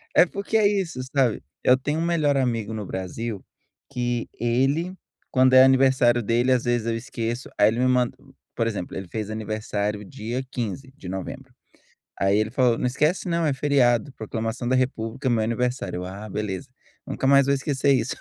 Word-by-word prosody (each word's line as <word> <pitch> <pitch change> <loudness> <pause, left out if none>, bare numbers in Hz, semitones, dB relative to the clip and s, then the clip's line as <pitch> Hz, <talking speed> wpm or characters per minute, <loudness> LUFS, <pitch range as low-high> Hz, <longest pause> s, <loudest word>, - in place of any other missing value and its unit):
É - - +8
porque 200 +4 -2
é 210 -2 +5
isso, 190 -9 -1 0.2
sabe, 130 -5 +2 0.2
eu 130 +1 +5
tenho 150 +4 -2
um 165 - 0
melhor 155 -5 +2
amigo 115 -5 0
no 105 -2 -4
Brasil 95 +3 -5 0.5
que 120 -3 -2
ele 135 +9 +1 0.4
quando 130 0 +4
é 130 - +9
aniversário 130 -2 +4
dele, 120 +4 +1
às 125 -2 +2
vezes 120 -2 +1
eu 115 - 0
esqueço, 120 0 -4
aí 105 - +6
ele 115 +2 -2
me 130 - +3
man 125 -1 +3 0.4
por 115 - 0
exemplo, 100 -5 -4
ele 95 -1 -6
fez 110 +3 -4
aniversário 105 -1 -3
dia 120 +6 -5
15 125 +3 -4
de 95 - -10
novembro. 95 +1 -6 0.6
Aí 95 +2 +2
ele 110 0 +1
falou: 120 -1 +2
"Não - - -2
esquece 150 +9 0
não, 170 -1 +1
é 150 - +2
feriado. 135 -3 +2
Proclamação 115 +2 -4
da 130 - +2
república, 130 +1 -1
meu 115 -2 +2
aniversário." 115 -5 -2
Ah 100 +3 -8
beleza, 105 +6 -4 0.4
nunca 135 - -2
mais 140 0 +6
vou 140 - +2
esquecer 140 0 +1
isso. 120 -2 0
120 Hz, 180 wpm, -24 LUFS, 110-135 Hz, 0.6 s, é